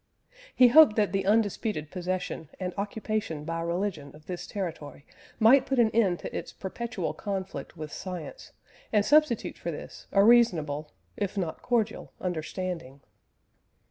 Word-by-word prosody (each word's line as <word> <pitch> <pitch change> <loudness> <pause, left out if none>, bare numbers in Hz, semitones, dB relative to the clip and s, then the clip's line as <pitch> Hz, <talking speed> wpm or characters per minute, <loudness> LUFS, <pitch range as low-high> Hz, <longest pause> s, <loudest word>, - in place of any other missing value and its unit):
He 250 -1 +7
hoped 295 -4 +8
that 210 -2 +2
the 195 -1 -1
undisputed 205 -6 +1
possession 180 -4 -3
and 180 -1 -3
occupation 205 -6 -3
by 165 +1 -3
religion 170 -4 -3
of 150 0 -17
this 180 -1 -6
territory 165 -7 -6 0.3
might 255 +4 +6
put 270 - 0
an 230 -2 +4
end 200 -6 +2
to - - -6
its - - -4
perpetual 235 +5 -4
conflict 190 -3 -5
with 155 -1 -7
science, 185 - -7 0.4
and 210 -2 +3
substitute 300 -5 +3
for 170 - -4
this 155 - -8
a 195 - +5
reasonable, 160 -11 +3 0.3
if 200 0 -3
not 170 -5 -3
cordial, 225 -3 -1
understanding. 170 -4 -4
190 Hz, 140 wpm, -28 LUFS, 165-220 Hz, 0.4 s, hoped